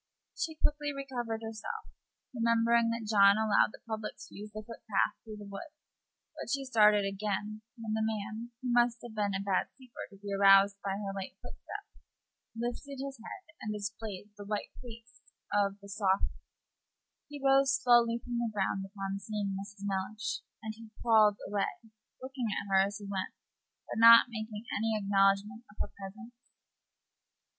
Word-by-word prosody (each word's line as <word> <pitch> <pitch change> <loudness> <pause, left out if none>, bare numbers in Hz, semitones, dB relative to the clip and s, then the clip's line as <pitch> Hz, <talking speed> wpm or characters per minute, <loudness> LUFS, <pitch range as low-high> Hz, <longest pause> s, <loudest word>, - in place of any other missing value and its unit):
She 325 -3 -2
quickly 295 -1 0
recovered 245 -5 -4
herself, 220 -1 -5 0.5
remembering 230 0 +3
that 230 -1 -2
John 200 -1 +6
allowed 220 -2 +4
the - - -15
public 220 -1 -4
to - - -12
use 210 +1 -8
the 215 +1 -7
footpath 220 -2 -1
through 215 -2 -9
the 205 - -9
wood; 200 +8 -8 0.6
but - - -7
she 275 -1 -1
started 210 -5 +5
again 210 +2 -3 0.2
when 225 -2 -4
the 220 - 0
man, 220 +1 -3 0.2
who 245 - 0
must 240 -1 +3
have 240 -2 -8
been 205 -2 0
a 195 +1 -3
bad 195 -2 +1
sleeper, 255 -3 -10
to 200 - -15
be 200 0 -5
aroused 195 0 +6
by 195 -1 -1
her 200 -1 -4
light 195 -1 -6
footstep, - - -8 0.7
lifted 245 +4 -4
his 270 -2 -6
head 335 +9 -10
and 215 - -3
displayed 210 -1 -6
the - - -6
white 210 +1 -4
face 230 -2 -12 0.3
of 200 -1 +1
the 200 - -12
softy. 200 -1 +1 1.0
He 290 - -7
rose 270 0 +4
slowly 240 -2 +4
from 240 0 -4
the 235 -1 0
ground 195 -1 -1
upon 195 0 -4
seeing 205 -1 -3
Mrs. 200 +1 -7
Mellish, 200 +3 -2 0.2
and 220 0 -4 0.3
crawled 215 -3 +5
away, 200 0 -1 0.4
looking 260 -2 -4
at 210 - -2
her 190 - +7
as 200 +1 0
he 205 - -9
went, 195 -1 -4 0.5
but - - -4
not 230 +2 +9
making 220 0 -5
any 220 +1 +1
acknowledgment 200 +2 +2
of 210 - -18
her - - -2
presence. 215 +5 -9
215 Hz, 165 wpm, -31 LUFS, 200-235 Hz, 1.0 s, not